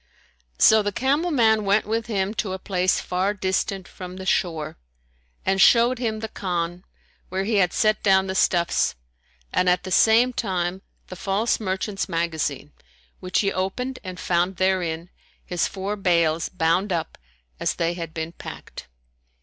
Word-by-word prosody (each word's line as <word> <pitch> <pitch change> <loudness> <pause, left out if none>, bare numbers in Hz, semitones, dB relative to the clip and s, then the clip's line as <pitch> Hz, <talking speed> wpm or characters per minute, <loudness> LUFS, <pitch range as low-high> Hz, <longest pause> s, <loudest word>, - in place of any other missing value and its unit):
So 220 0 +6
the 205 0 -1
camel 280 - +1
man 220 -7 +3
went 200 +2 +2
with 225 +1 -2
him 200 -2 -1
to 205 -3 -2
a - - -3
place 185 -1 0
far 185 +3 -1
distant 190 0 -1
from 180 -1 -9
the 190 - -7
shore 165 - -1 0.7
and 190 0 +2
showed 240 +4 +5
him 220 -3 -2
the 220 - -3
Khan 175 -3 -3 0.5
where 190 +1 -1
he 215 +1 0
had 180 -3 +3
set 215 -3 +2
down 190 -1 +4
the 190 - -3
stuffs, 175 -2 +2 0.6
and 180 - +3
at 180 - +2
the 185 - -6
same 230 +6 +5
time 185 -4 -2 0.3
the 185 - -7
false 200 +5 0
merchant's 195 0 -3
magazine, 160 -4 -2 0.5
which 185 0 0
he 195 -2 0
opened 250 +8 -3
and 185 -2 -7
found 180 +2 0
therein 180 -2 0 0.3
his 175 -1 0
four 195 +2 -4
bales 170 -4 +1
bound 180 +3 +1
up 170 -2 -2 0.4
as - - 0
they 170 0 0
had 165 -2 -6
been 160 0 -4
packed. - - -10
190 Hz, 160 wpm, -24 LUFS, 175-210 Hz, 0.7 s, So